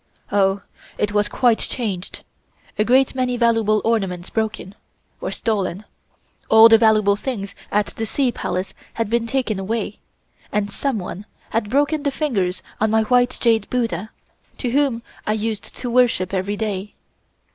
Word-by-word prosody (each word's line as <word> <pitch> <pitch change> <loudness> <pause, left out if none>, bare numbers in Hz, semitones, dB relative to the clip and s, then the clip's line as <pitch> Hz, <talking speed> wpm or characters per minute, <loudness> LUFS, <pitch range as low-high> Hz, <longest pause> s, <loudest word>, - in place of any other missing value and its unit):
Oh! 195 0 +2 0.3
it 210 - 0
was 205 0 +1
quite 240 -3 +3
changed; 200 -7 -4 0.6
a - - +5
great 255 +4 +3
many 255 -1 0
valuable 225 -3 +2
ornaments 195 -6 -1
broken 220 -3 -2 0.5
or - - -2
stolen. 205 -3 -2 0.6
All 220 +1 +9
the 225 0 +7
valuable 215 -3 +4
things 205 -3 -4 0.2
at 210 0 +2
the 225 - -3
Sea 260 +2 +1
Palace 185 -4 -3 0.2
had 225 -2 -2
been 235 0 +1
taken 230 -5 -1
away, 210 +1 -3 0.5
and 205 -1 -1
someone 210 -5 -3 0.2
had 220 -2 -1
broken 290 +4 +2
the 285 - +1
fingers 215 - -1 0.2
of 220 - +2
my 220 0 +3
white 245 +2 +2
jade 225 -4 +2
Buddha, 220 -5 -1 0.5
to 245 - -2
whom 265 -4 +1 0.2
I 215 - +2
used 215 0 -3
to 245 -2 -4
worship 235 -7 +2
every 195 +2 -1
day. 205 -2 -3
220 Hz, 150 wpm, -21 LUFS, 200-240 Hz, 0.6 s, All